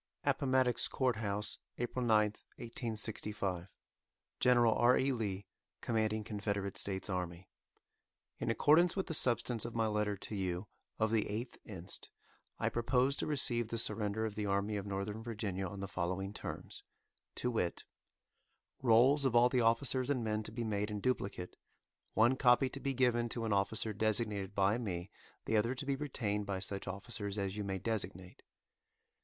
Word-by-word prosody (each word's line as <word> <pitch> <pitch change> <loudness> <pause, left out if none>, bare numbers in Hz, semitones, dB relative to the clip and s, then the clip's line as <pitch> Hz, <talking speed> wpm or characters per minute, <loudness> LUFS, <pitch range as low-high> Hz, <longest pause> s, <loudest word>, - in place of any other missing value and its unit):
APPOMATTOX 130 -2 +2
COURT 130 -3 +1
HOUSE, 105 -1 -2 0.2
APRIL 120 +1 -2
9, 110 -3 +5 0.3
1865. 105 -5 -3 0.7
General 120 -2 +5
R. 120 +2 +5
E. 135 +1 +2
Lee, 100 -5 -2 0.4
Commanding 110 -2 0
Confederate 100 -2 -2
States 95 -1 -3
Army: 90 -2 -4 0.9
In - - -1
accordance 165 +4 +5
with 190 - -1
the 165 - -3
substance 120 -4 +3
of 120 0 -6
my 115 -1 +2
letter 105 -1 0
to 105 - -8
you 95 -1 -2 0.3
of 110 -1 +1
the 110 -2 +2
8th 115 +5 -4
inst., 95 -3 -7 0.5
I - - 0
propose 125 +3 +2
to - - -2
receive 125 -6 +1
the 115 - -3
surrender 110 -1 0
of 110 - -3
the 105 0 -2
Army 100 +2 0
of 100 0 -3
Northern 100 +2 -3
Virginia 105 -5 -3
on 100 +1 -7
the 100 - -3
following 95 +1 -2
terms, - - -6 0.5
to 125 - -1
wit: 90 -7 -1 1.0
Rolls 130 +4 +5
of 130 -3 +1
all 120 +1 +7
the 125 -1 +2
officers 125 +3 +2
and 130 -4 +1
men 110 -1 0
to 110 - -7
be 120 +1 -3
made 105 -1 -1
in 105 -1 -3
duplicate, 100 -6 -2 0.6
one 120 +4 +4
copy 130 +1 +5
to 135 - -7
be 135 -1 -2
given 120 -2 +2
to 115 0 -2
an 110 - +1
officer 110 +2 +1
designated 105 -2 +1
by 100 +4 +3
me, 95 -4 -4 0.3
the 110 - 0
other 115 +5 +1
to 140 - -5
be 140 0 +1
retained 110 -8 -2
by 100 -1 -1
such 100 +1 -4
officers 100 +1 -3
as 100 -1 -2
you 105 - -3
may 95 -1 -2
designate. 95 -3 -3
110 Hz, 165 wpm, -34 LUFS, 100-120 Hz, 1.0 s, all